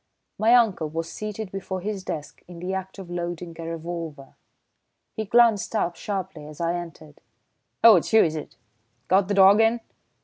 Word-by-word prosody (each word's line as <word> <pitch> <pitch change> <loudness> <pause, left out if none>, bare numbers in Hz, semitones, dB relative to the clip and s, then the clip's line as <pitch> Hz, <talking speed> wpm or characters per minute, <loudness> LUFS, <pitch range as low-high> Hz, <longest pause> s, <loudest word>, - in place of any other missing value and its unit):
My 225 +3 +5
uncle 210 -10 +2
was 165 +1 -4
seated 215 -2 -6
before 190 -1 -5
his 200 -1 -4
desk 150 -5 -6
in 175 -1 -11
the 180 +3 -4
act 190 +1 -5
of 185 -3 -9
loading 175 -1 -5
a 165 - -6
revolver. 165 -4 -6 0.8
He 220 - -3
glanced 230 -1 +3
up 175 -5 0
sharply 185 -5 -5
as 150 0 -12
I 170 0 0
entered. 165 -3 -8 0.6
"Oh, 225 -4 +9
it's 170 - -2
you, 220 -1 +6
is 160 -2 -1
it? 155 - -7 0.5
Got 190 +1 +4
the 205 - -1
dog 195 +2 +7
in?" 225 +2 +3
185 Hz, 175 wpm, -24 LUFS, 165-205 Hz, 0.8 s, Oh